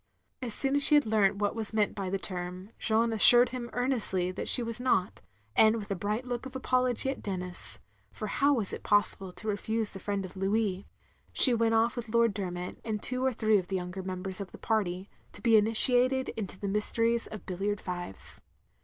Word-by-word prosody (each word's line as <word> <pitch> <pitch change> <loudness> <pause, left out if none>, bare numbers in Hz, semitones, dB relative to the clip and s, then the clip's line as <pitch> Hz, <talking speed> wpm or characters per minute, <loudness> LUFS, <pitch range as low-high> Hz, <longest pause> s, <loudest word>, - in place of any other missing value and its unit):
As 235 -4 -5
soon 275 0 +1
as 285 - +2
she 300 - +9
had 290 - +4
leamt 210 -3 +2
what 205 0 -1
was 220 -2 -5
meant 210 -2 +1
by 195 -2 -4
the 195 - -1
term, 185 +1 -7
Jeanne 225 +1 +1
asstired 240 +3 +7
him 245 -2 -6
earnestly 225 -8 -1
that - - -6
she 245 - +3
was 230 +1 -1
not; 220 -8 0 0.3
and 220 0 +5
with 205 -3 -6
a - - 0
bright 210 +6 -3
look 245 +1 -4
of 265 - -14
apology 255 0 0
at 270 - -8
Denis 180 -3 -5 0.2
— 100 0 -39
^for 215 - -3
how 280 +7 +1
was 215 -6 -3
it - - -6
possible 200 -2 0
to 220 - -10
reftise 220 +1 -2
the 195 - -9
friend 200 -1 -3
of 185 - -12
Louis 195 0 -1 0.2
— - - -36
she 255 - +7
went 225 -1 +1
off 225 +1 +2
with 235 -2 -6
Lord 230 -1 +2
Dermot, 180 -3 -5
and 215 -2 -3
two 255 +4 0
or 265 - +2
three 220 -3 +2
of 180 - -7
the 195 - -3
younger 180 +1 -5
members 185 +1 -6
of 195 - -8
the - - -11
party, 190 -4 -2 0.3
to - - -11
be 230 -2 +4
initiated 245 +4 +4
into 195 -4 -6
the 200 - -4
mysteries 230 +3 0
of 215 -4 -10
bil 185 -1 -6
liard 205 +1 -1
fives. 175 - -7
215 Hz, 220 wpm, -29 LUFS, 190-235 Hz, 0.3 s, she